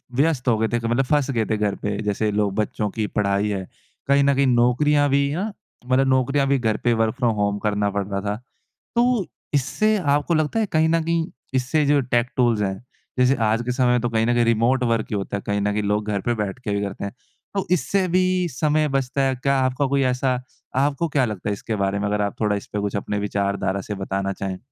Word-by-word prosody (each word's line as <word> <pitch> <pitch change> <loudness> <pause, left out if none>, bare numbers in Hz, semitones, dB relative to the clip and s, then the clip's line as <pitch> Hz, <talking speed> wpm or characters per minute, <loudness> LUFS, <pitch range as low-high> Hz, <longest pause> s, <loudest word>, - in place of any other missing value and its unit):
व्यस्त 140 -2 +1
हो 115 -3 +4
गए 110 - +1
थे। 120 - +2
क 115 - -12
मतलब 120 +3 +2
फँस 145 0 +1
गए 115 -4 0
थे 110 - -1
घर 105 -1 0
पे। 100 -1 -3
जैसे 105 +1 0
लोग 105 -1 0
बच्चों 105 0 -1
की 110 +2 -2
पढ़ाई 100 0 0
है। 95 -2 -3 0.4
कहीं 140 0 +4
न 140 0 +4
कहीं 135 0 +3
नौकरियाँ 135 +4 +3
भी 140 +1 +2
ना 200 +6 -2 0.3
मतलब 130 +1 +2
नौकरियाँ 135 +2 +2
भी 140 0 +3
घर 110 -2 0
पे 120 - +3
वर्क 110 0 +1
फ़्रॉम 120 -3 +1
होम 100 0 0
करना 105 -1 0
पड़ता 100 -1 -2
था। 105 +1 -2 0.6
तो 240 -4 +2 0.3
इससे 215 - +2
आपको 145 -1 +1
लगता 155 +8 +1
है 220 - +2
कहीं 160 0 +3
न 165 0 +2
कहीं 165 0 0 0.3
इससे 130 +4 +1
जो 145 0 +4
टेक 120 -1 +1
टूल्स 120 -4 +3
हैं 95 +3 -2 0.4
जैसे 125 +2 +4
आज 110 +1 +2
के 125 - -1
समय 125 0 +1
में 125 -1 +2
तो 120 - 0
कहीं 115 -1 +1
न 120 - +2
कहीं 120 -1 +3
रिमोट 115 +3 +2
वर्क 115 -2 0
ही - - 0
होता 100 0 -3
है। - - -8
कहीं 100 0 0
न 105 0 +1
कहीं 105 0 -1
लोग 105 +1 0
घर 100 - 0
पे 120 - +3
बैठ 100 +4 -5
के 115 -5 -4
भी 100 - 0
करते 100 -1 -4
हैं। 100 - -6 0.4
तो 195 - 0
इससे 185 +2 +1
भी 185 0 +2
समय 150 +3 +1
बचता 135 0 -1
है, 135 -1 +1
क्या 140 +2 0
आपका 130 +2 +1
कोई 140 0 +1
ऐसा? 125 0 0 0.3
आपको 140 +4 +1
क्या 140 -3 +1
लगता 105 -3 -4
है - - 0
इसके 110 +2 -4
बारे 100 0 0
में? 100 - -1
अगर 105 0 0
आप 100 -1 -1
थोड़ा 105 -1 +2
इसपे 100 +1 -5
कुछ 100 0 -2
अपने 100 +1 -2
विचारधारा 100 -1 -1
से 105 +2 -5
बताना 95 0 -2
चाहें। 95 -1 -4
120 Hz, 240 wpm, -22 LUFS, 105-140 Hz, 0.6 s, हो